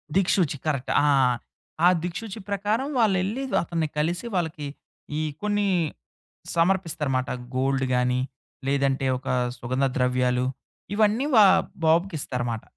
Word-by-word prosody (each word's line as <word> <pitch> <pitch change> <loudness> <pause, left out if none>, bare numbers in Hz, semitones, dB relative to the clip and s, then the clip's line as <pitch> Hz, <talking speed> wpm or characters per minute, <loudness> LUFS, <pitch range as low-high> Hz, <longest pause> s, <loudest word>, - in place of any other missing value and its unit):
దిక్షూచి. 180 -5 +2
Correct. 140 -4 -1
ఆ! - - +4 0.8
ఆ - - +9 0.2
దిక్షుచి 210 +4 -5
ప్రకారం 210 +7 0
వాళ్ళు 205 -5 +4
ఎళ్లి, 230 +8 -2 0.2
అతన్ని 165 -2 -1
కలిసి, 175 +7 0
వాళ్ళకి 160 -4 -2 0.5
ఈ - - 0 0.2
కొన్ని 205 -1 +1 0.9
సమర్పిస్తారనమాట. 165 -7 +1 0.3
గోల్డ్ 135 0 +1
గాని, 125 0 +1 0.5
లేదంటే 135 -1 +1
ఒక 130 - -12 0.3
సుగంధ 130 +3 0
ద్రవ్యాలు 125 0 +1 0.5
ఇవన్నీ 215 +5 +3 0.2
ఆహ్, 190 - +6 0.2
బాబుకి 170 +3 +3
ఇస్తారన్నమాట. 120 -4 -3
160 Hz, 115 wpm, -25 LUFS, 130-195 Hz, 0.9 s, ఆ